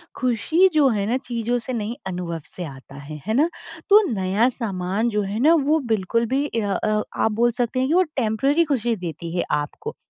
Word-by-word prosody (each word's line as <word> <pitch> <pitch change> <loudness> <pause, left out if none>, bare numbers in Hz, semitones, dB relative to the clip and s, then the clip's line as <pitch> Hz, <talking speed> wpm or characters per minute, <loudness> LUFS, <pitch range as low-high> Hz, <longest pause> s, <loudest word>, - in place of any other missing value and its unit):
खुशी 260 - +2
जो 300 -3 +5
है 200 - 0
ना 245 - +2
चीज़ों 240 0 -1
से - - -1
नहीं 225 0 -3
अनुभव 175 -3 -4
से 180 - -5
आता 135 -2 -11
है। 145 +2 -9
है 220 - -1
ना? 295 +8 +3 0.4
तो 415 +2 +8
नया 200 +3 +1
सामान 205 -2 -2
जो 210 -2 0
है 200 +2 -3
ना 305 +7 +5
वो 315 +2 +4
बिल्कुल 220 +3 0
भी 275 +2 +2
इया 220 -8 -1
अ 215 0 +1
आप 220 - +1
बोल 235 +3 +2
सकते 245 +1 -1
हैं 260 - +1
कि 310 - +1
वो 370 +2 +5
टेम्परेरी 270 +7 +2
खुशी 240 -6 0
देती 170 -2 -6
है - - +1 0.2
आपको। 435 - -7
225 Hz, 210 wpm, -22 LUFS, 190-260 Hz, 0.4 s, तो